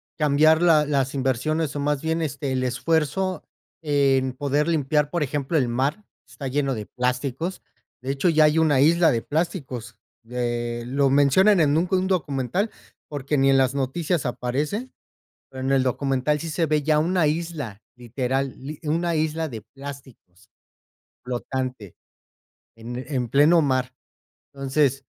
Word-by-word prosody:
cambiar 155 +2 +4
la 160 -3 +5
las 140 -2 0
inversiones 135 +3 -1
o 145 - -2
más 145 0 -1
bien 160 +1 0
este, 140 -2 -3
el 130 -1 0
esfuerzo 160 +7 0 0.4
en 135 -3 +2
poder 145 +3 0
limpiar, 150 -2 +1
por 170 -2 -1
ejemplo, 145 +3 -1
el 130 -5 +2
mar, 140 - -1 0.2
está 140 - -7
lleno 135 0 0
de 105 -2 -5
plásticos. 130 - -3 0.4
De 135 - -2
hecho, 140 +6 +1
ya 155 -1 +4
hay 150 +1 +4
una 150 -4 +3
isla 165 +3 +5
de 115 -4 0
plásticos, 135 - -3 0.3
eh, 120 -1 -2
lo 135 +2 +1
mencionan 155 +9 +4
en 145 -2 +3
un 175 +2 +1
un 185 0 +1
documental 175 - -1 0.4
porque 145 0 -2
ni 135 0 +4
en 135 - +5
las 130 0 +2
noticias 140 +2 -1
aparece, 145 - -2 0.6
pero 130 - -8
en 135 - -1
el 135 -1 +3
documental 135 +3 0
sí 165 - -5
se 165 +2 0
ve 155 -1 +1
ya 150 +1 +2
una 170 0 +2
isla 150 -9 -3
literal, 130 +2 -2 0.3
una 165 +2 0
isla 160 0 -1
de 115 -3 -6
plásticos 125 -4 -12 0.8
flotante 125 -4 -4 0.8
en 115 +2 -7
en 125 -5 -2
pleno 155 +5 +5
mar, 130 -2 0 0.6
entonces 135 0 0
140 Hz, 150 wpm, -24 LUFS, 130-155 Hz, 0.8 s, la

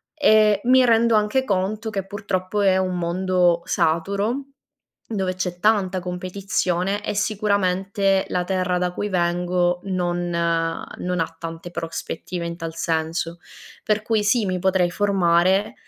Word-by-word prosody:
Ehm, 215 -8 +4
mi 255 +1 +5
rendo 230 0 +4
anche 215 +5 +2
conto 210 +1 -1
che 195 -3 -4
purtroppo 200 -1 -2
è 190 -2 +4
un 185 -1 -1
mondo 175 0 +1
saturo, 200 - 0 0.7
dove 190 -3 -1
c'è 180 -1 -3
tanta 195 -2 +2
competizione 185 +1 -2
e - - -2
sicuramente 195 -2 +1
la 180 0 -1
terra 185 -1 0
da 180 0 -1
cui 205 +3 -3
vengo 175 -1 0
non 175 -2 -1
non 170 +1 -2
ha 165 0 -3
tante 165 +1 -7
prospettive 170 +1 -5
in 170 0 -5
tal 165 -1 -6
senso, 165 +1 -2 0.4
per 215 0 0
cui 215 -1 +1
sì, 215 +1 +2
mi 185 -1 -1
potrei 190 -1 +2
formare, 190 0 +2
185 Hz, 135 wpm, -22 LUFS, 175-205 Hz, 0.7 s, mi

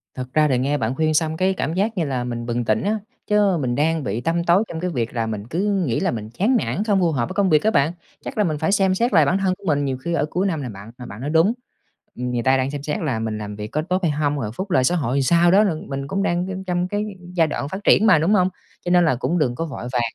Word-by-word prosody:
Thật 130 0 -7
ra 155 -1 +4
thì 130 -3 +1
nghe 140 +3 0
bạn 120 +1 -2
khuyên 155 +1 +1
xong 160 +1 0
cái 190 +1 +2
cảm 160 -3 -2
giác 205 +3 -1
như 170 - +1
là 130 -3 -2
mình 120 -1 -4
bừng 120 0 -2
tỉnh 110 0 +1
á, 215 +2 0 0.3
chớ 205 -4 +3
mình 120 -2 -1
đang 160 +2 +1
bị 120 -2 -2
tăm 170 +3 0
tối 175 +4 +4
trong 160 - -5
cái 180 +2 -2
việc 120 -8 -3
là 115 -2 -1
mình 110 0 -5
cứ 195 +4 0
nghĩ 115 -3 0
là - - 0
mình 110 -2 -5
chán 205 - +1
nản, 205 - -2
không 205 -3 +2
phù 170 -3 +2
hợp 120 -5 -1
với - - -5
công 195 -1 +2
việc 155 -1 +4
á 220 - +3
bạn. 140 -1 +2 0.3
Chắc - - -6
là 210 - +3
mình 155 -5 -1
phải 160 +6 0
xem 190 -2 +3
xét 235 +2 0
lại 160 -4 +6
bản 180 +7 +2
thân 190 -1 +1
của - - -21
mình, 145 -2 +1
nhiều 130 -2 -2
khi 170 +6 -4
ở 150 -3 +1
cuối 190 +4 0
năm 160 -6 -2
nè 125 - -5
bạn, 100 +2 -10
mà 125 - -9
bạn 105 +1 -9
nói 145 - -3
đúng, 165 +7 +3 0.6
ừm, 125 0 -3
người 120 -1 -1
ta 130 0 +4
đang 130 +2 -1
xem 145 -1 -6
xét 150 - -2
là 135 -9 -1
mình 110 -1 -3
làm 105 -1 -6
việc 105 0 -6
có 155 +7 -2
tốt 185 +3 -2
hay 160 - +2
hông, 145 0 -1
rồi 110 -5 -3
phúc 190 0 -5
lợi 130 - +3
xã 175 +7 +2
hội 135 -4 -1
làm - - +2
sao 170 +5 +4
đó 200 +3 +6
lận 165 -7 -2
mình 135 0 -4
cũng 195 +5 -1
đang, 175 0 0
ư, 190 - -4
trong 180 0 0
cái 205 +2 -2 0.3
giai 165 -3 +3
đoạn 145 -1 -4
phát 195 +3 -6
triển 215 - +5
mà, 160 -6 +6
đúng 175 +7 +2
hông? 185 -2 +3 0.4
Cho 175 - -1
nên 175 -1 +5
là 145 - +2
cũng 165 +8 -1
đừng 125 -5 +1
có 165 - -3
vội 140 -6 -7
vàng, 120 - +2
155 Hz, 320 wpm, -22 LUFS, 130-185 Hz, 0.6 s, lại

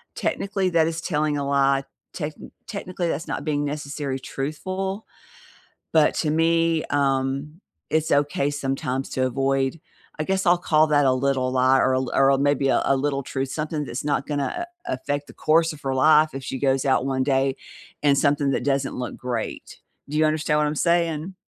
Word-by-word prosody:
technically, 195 -2 -1
that 165 -1 +3
is 165 0 -3
telling 150 -3 0
a 140 -1 -2
lie, 140 -1 +2 0.3
techni 150 -2 -6 0.2
technically, 185 -4 -4
that's 160 +2 -3
not - - -3
being 145 -2 -1
necessary 145 -2 -4
truthful, 185 +10 -4 0.9
but 155 -2 +4
to 155 - 0
me, 165 0 +2
um, 140 +3 -1 0.3
it's 160 0 0
okay 145 0 +2
sometimes 135 -2 -2
to 130 - 0
avoid 135 +3 0 0.4
I - - +1
guess 190 +1 0
I'll 175 0 +5
call 155 -2 +3
that 145 -2 +3
"a 130 - +5
little 130 -1 0
lie" 130 +1 +4
or 130 - +3
a 130 - +2
l 130 - -4
or 135 0 +5
a 135 - +4
maybe 145 0 +2
a - - +3
"a 135 - +3
little 140 0 -1
truth," 135 0 -3
something 155 -1 -3
that's 120 +1 -5
not 145 -1 0
gonna 150 - -2 0.2
a - - -1
affect 145 0 -3
the - - -13
course 160 +1 +2
of 150 - -13
her 135 -1 -2
life 155 +2 +5
if 135 - -5
she 130 0 -4
goes 135 0 +1
out 130 -2 +2
one 130 -1 0
day 135 -1 +1 0.5
in 145 -1 +5
something 140 0 +2
that 135 - -1
doesn't 135 0 0
look 125 -1 -5
great. 120 -3 -5 0.3
Do 150 - -4
you 155 - +4
understand 155 -1 +1
what 150 - +2
I'm 150 - -2
saying? 170 +1 0
145 Hz, 195 wpm, -24 LUFS, 135-155 Hz, 0.9 s, I'll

